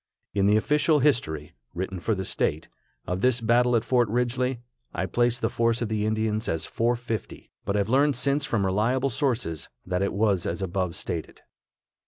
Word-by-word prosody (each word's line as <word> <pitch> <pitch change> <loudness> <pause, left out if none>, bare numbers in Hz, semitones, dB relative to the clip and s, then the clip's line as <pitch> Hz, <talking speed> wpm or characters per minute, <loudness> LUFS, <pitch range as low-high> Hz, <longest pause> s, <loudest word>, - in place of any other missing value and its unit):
In 100 -1 +2
the 105 +1 +5
official 150 +6 +3
history 95 - 0 0.2
(written 95 +1 -3
for 110 +5 0
the 95 0 -4
state) 80 -2 -1 0.4
of 90 +1 -2
this 125 0 +3
battle 120 +2 +3
at 115 - +1
Fort 120 -4 +2
Ridgely, 125 +2 0 0.4
I 90 - -1
place 120 +5 +1
the 110 - 0
force 115 0 +1
of 115 - -2
the 110 -1 0
Indians 110 0 -1
as 80 -1 -1
450, 115 -2 -3
but 100 - -1
have 100 -1 +1
learned 140 +4 +3
since 140 +3 +1
from 110 -8 0
reliable 120 +8 +1
sources 120 - -1 0.2
that 90 0 -1
it 100 - +1
was 100 -3 +1
as 85 +3 -2
above 90 -2 -2
stated. 80 -2 -5
110 Hz, 180 wpm, -26 LUFS, 95-125 Hz, 0.4 s, the